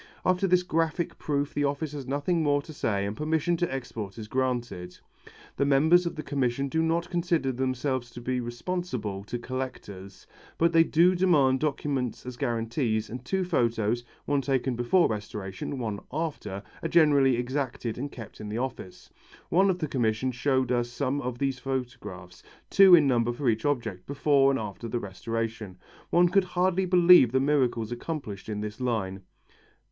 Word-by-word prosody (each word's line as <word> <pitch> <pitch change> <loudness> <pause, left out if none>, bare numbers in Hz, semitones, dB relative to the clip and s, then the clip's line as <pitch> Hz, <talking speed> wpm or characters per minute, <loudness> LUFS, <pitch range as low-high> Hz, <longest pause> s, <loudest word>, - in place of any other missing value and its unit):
After 185 +1 +2
this 180 0 +3
graphic 165 -1 -1
proof 145 -1 -1
the 145 - 0
office 145 +2 -2
has 140 -3 -7
nothing 145 +5 0
more 145 -2 +2
to 155 - -10
say 100 -7 -1
and 100 +1 -3
permission 160 +4 0
to 175 -2 -1
export 115 -6 -5
is 110 -2 -7
granted. 120 -8 -2 0.6
The 140 - +2
members 160 +6 +4
of - - -4
the 155 - -5
Commission 140 -1 -1
do 160 +4 +1
not 165 +2 0
consider 170 -6 0
themselves 130 0 -2
to - - -8
be 125 +1 -2
responsible 120 - -4
to 120 +3 -4
collectors. 120 -7 -7 0.3
But 170 +1 +2
they 165 0 +7
do 170 +3 +4
demand 150 -8 +3
documents 135 -5 -2
as 125 -1 -6
guarantees, 115 -3 -1
and 125 +1 -6
two 190 +8 -1
photos, 120 - 0 0.2
one 145 -1 +1
taken 130 -1 0
before 120 +10 +3
restoration 105 0 -5
and 135 - -5
one 110 -4 -3
after, 145 -10 -4 0.2
are - - -2
generally 145 -6 +5
exacted 125 -2 -3
and 140 +2 -4
kept 115 -3 -10
in 105 - -6
the 105 - -3
office. 120 -7 -6 0.4
One 190 +3 +4
of 185 - +1
the 160 -4 -2
Commission 120 -1 0
showed 130 0 0
us 120 -1 +1
some 140 +3 -2
of 125 -2 -4
these 135 0 -1
photographs, 120 -9 -6 0.3
two 195 -2 +8
in 155 -4 +5
number 120 -3 +2
for 130 +2 -3
each 110 -1 +1
object, 120 -10 -2
before 140 -1 +3
and 135 - +1
after 105 0 -6
the 120 +1 -2
restoration. 110 -1 -4 0.3
One 175 +1 +5
could 195 +1 +3
hardly 185 +1 +2
believe 175 -8 +7
the 130 - +2
miracles 130 -5 +1
accomplished 120 -6 -5
in 105 -1 -3
this 105 0 -6
line. 100 -6 -2
130 Hz, 175 wpm, -27 LUFS, 115-155 Hz, 0.6 s, two